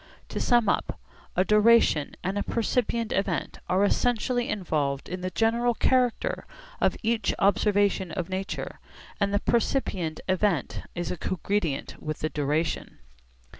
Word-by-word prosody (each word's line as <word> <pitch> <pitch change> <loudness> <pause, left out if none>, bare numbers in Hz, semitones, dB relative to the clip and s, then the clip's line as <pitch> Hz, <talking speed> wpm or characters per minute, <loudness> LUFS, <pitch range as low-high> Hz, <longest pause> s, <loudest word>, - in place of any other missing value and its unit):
To - - -3
sum 240 -3 +3
up, - - 0 0.4
a 185 - +3
duration 210 -8 +4
and 190 +2 -1
a 205 - 0
percipient 230 0 0
event 195 -2 -1
are 185 +2 +3
essentially 245 +3 +1
involved 150 -8 -1
in 185 0 -5
the 185 - -2
general 235 +4 +1
character 255 - +1 0.3
of - - +2
each 225 0 +1
observation 200 -2 +2
of 175 0 -3
nature, 190 +1 -4 0.4
and 200 -1 +1
the 205 - +2
percipient 195 - 0
event 185 -5 0
is 175 -1 -2
cogredient 180 -3 -2
with 155 0 -4
the 155 - 0
duration. 150 +3 -1
200 Hz, 130 wpm, -27 LUFS, 175-230 Hz, 0.4 s, duration